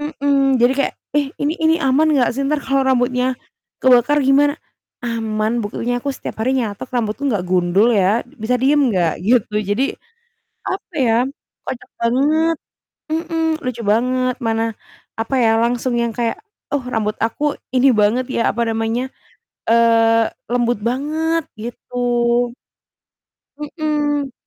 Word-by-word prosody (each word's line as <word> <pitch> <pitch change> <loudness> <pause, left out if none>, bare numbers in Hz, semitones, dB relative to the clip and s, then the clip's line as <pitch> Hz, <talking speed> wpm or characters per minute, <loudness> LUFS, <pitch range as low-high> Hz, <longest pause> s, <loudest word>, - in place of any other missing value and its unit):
Mhm. 280 -3 +1
Jadi 245 +2 +5
kayak, 280 - 0 0.2
"Eh, 290 -1 +2
ini 290 +2 0
ini 320 0 +4
aman 275 +4 +3
enggak 270 -6 +3
sih? 270 - -4
Entar 295 +1 0
kalau 270 0 +1
rambutnya 250 0 +1 0.4
kebakar 260 +3 +4
gimana?" 285 +2 +4 0.5
"Aman. 225 0 -1
Buktinya 235 +3 -2
aku 280 - -4
setiap - - -7
hari 260 +4 +1
nyatok 220 -1 -3
rambutku, 235 +4 -1
enggak 200 -7 -1
gundul 180 +4 +2
ya. 205 +2 +2
Bisa 245 -2 -3
diem 290 +3 +3
nggak?" 175 -6 +1
Gitu. 220 +1 +1
Jadi, 205 +6 0 0.9
apa 380 -1 -5
ya, 235 -4 +3 0.5
kocak 250 - -6
banget, 300 +7 +2 0.6
mhm, 325 0 -1 0.2
lucu 245 -2 -3
banget, 255 +2 +1
mana, 225 0 0 0.6
apa 230 +4 -2
ya, 225 - +4
langsung 240 +1 0
yang 235 -1 0
kayak, 230 0 -1 0.4
"Oh, 285 -2 0
rambut 220 -4 -2
aku 290 +6 -1 0.2
ini 260 +1 +4
banget 235 +5 +2
ya," - - +1
apa 235 - -1
namanya, 225 +3 -1 0.6
eee, 230 0 +4 0.2
"lembut 240 -1 +1
banget." 305 +7 -1 0.2
Gitu 240 +2 -9 1.6
Mhm. 295 -2 -1
250 Hz, 135 wpm, -19 LUFS, 225-285 Hz, 1.6 s, Jadi